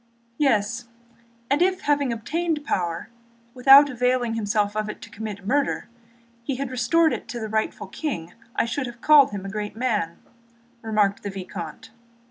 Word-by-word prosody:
"Yes, 235 -4 +1 0.7
if 360 +6 +2
having 285 -3 +1
obtained 300 +7 -2
power, 170 -7 -2 0.4
without 270 +3 +8
availing 250 -2 0
himself 210 -1 0
of 215 0 -1
it - - -7
to - - -11
commit 205 -2 -7
murder 275 +4 0 0.5
he 265 +2 -2
had 270 0 -4
restored 315 +6 +3
it - - -5
to 245 -3 -5
the 220 - -4
rightful 220 -1 -2
king, 190 - -5 0.2
I - - +2
should 255 +3 -2
have 240 -1 -9
called 295 +1 +6
him 200 -2 -6
a - - -4
great 210 0 -4
man," 215 -8 -1 0.6
remarked 210 -3 +1
the 205 - -4
vicomte. 195 +4 -7
235 Hz, 155 wpm, -24 LUFS, 210-275 Hz, 0.7 s, without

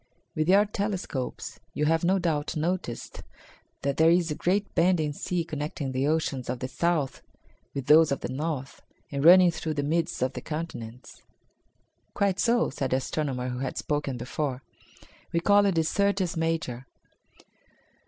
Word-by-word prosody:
"With 155 +2 0
your 200 +2 +6
telescopes 195 -10 -4 0.2
you 150 - +1
have 160 +2 +2
no 185 +3 +3
doubt 160 -3 -1
noticed 165 -6 -3 0.6
that 140 0 -1
there 160 +1 +6
is 170 -1 +3
a - - -1
great 200 +5 0
bending 165 -4 +2
sea 175 +3 -2
connecting 150 -3 -4
the 130 +2 0
oceans 150 -5 -1
of 125 - -1
the 130 - -4
south 155 0 -1 0.5
with 135 -2 -3
those 155 +1 +6
of 140 - -1
the - - -3
north 140 -1 -4 0.3
and 140 -1 -2
running 180 +1 +8
through 160 -1 -4
the 145 - -1
midst 160 -2 0
of 130 +1 -1
the - - -6
continents." 130 -7 -7 0.9
"Quite 200 -1 +1
so," 240 +1 +2
said 135 -1 -2
the 130 - +2
astronomer 130 -2 -2
who 125 0 -4
had 130 -1 -4
spoken 145 -3 -2
before, 130 +2 -3 0.7
"we 170 - +3
call 200 +3 +4
it 190 - +1
the 165 - +3
Syrtis 195 +1 0
Major." 160 -6 -2
155 Hz, 165 wpm, -27 LUFS, 135-175 Hz, 0.9 s, running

